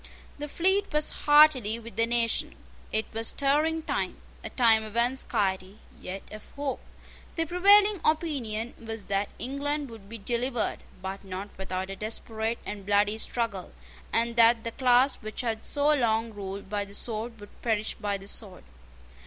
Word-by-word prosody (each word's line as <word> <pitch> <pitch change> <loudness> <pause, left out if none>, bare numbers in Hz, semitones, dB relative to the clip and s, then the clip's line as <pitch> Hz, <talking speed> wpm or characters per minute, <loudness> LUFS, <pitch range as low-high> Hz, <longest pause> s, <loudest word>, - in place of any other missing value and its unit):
The 295 - -4
fleet 380 +6 +1
was 300 0 +2
heartily 295 -7 +5
with 230 -3 -10
the 230 +1 +2
nation. 235 -1 0 0.4
It 220 0 0
was 225 +1 +3
a - - +2
stirring 305 +4 +2
time, - - -2 0.3
a - - -4
time 225 -3 +4
of 215 +1 -7
anxiety, 205 -6 0 0.2
yet 190 +2 -6
of 215 0 -10
hope. 285 -2 -2 0.6
The 330 - 0
prevailing 400 +3 +5
opinion 260 -8 0
was 225 -2 -6
that 195 +1 +1
England 280 +1 -2
would 210 -3 -12
be 230 - -7
delivered, 240 +3 -1 0.2
but 190 +1 -5
not 195 +1 -6
without 190 0 -4
a - - -5
desperate 220 +2 -2
and 205 -1 -6
bloody 205 +2 +2
struggle, 225 -6 -3 0.4
and 235 +1 +2
that 230 0 +6
the 230 - -3
class 255 +2 +3
which 215 +2 -4
had 225 -3 -2
so 290 +1 +2
long 225 -4 +1
ruled 200 -1 -6
by 205 +1 -2
the 200 0 -8
sword 225 +1 -2
would 205 - -14
perish 220 -2 0
by 205 -2 -2
the 195 0 -11
sword. 200 -2 -4
230 Hz, 165 wpm, -28 LUFS, 205-270 Hz, 0.6 s, that